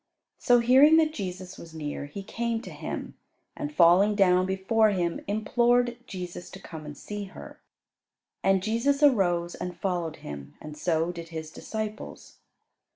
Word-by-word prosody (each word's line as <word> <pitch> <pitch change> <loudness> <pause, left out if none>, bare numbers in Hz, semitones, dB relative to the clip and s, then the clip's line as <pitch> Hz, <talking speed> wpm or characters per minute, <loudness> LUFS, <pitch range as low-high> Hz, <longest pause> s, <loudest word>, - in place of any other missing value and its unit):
So 245 -2 +4
hearing 270 +6 +7
that 310 -1 +3
Jesus 185 - -6
was 165 -1 -11
near, 145 -2 -5
he 195 +7 -7
came 230 +2 -2
to - - -8
Him, - - -6 0.4
and, 295 0 -4
falling 195 - +5
down 185 -2 +4
before 195 +4 +2
Him, 175 -4 -1
implored 240 +3 +2
Jesus 180 -2 -7
to 195 - -10
come 160 -4 -9
and 145 -1 -8
see 205 +5 -6
her. 190 - -12 0.8
And 195 -1 +2
Jesus 250 +7 +1
arose, 175 -10 +3
and 180 -1 -6
followed 175 -5 -2
him, 70 -1 -8
and 150 0 -9
so 165 +2 0
did 170 -1 -9
His 160 -1 -6
disciples. 215 +3 -6
190 Hz, 155 wpm, -27 LUFS, 170-225 Hz, 0.8 s, hearing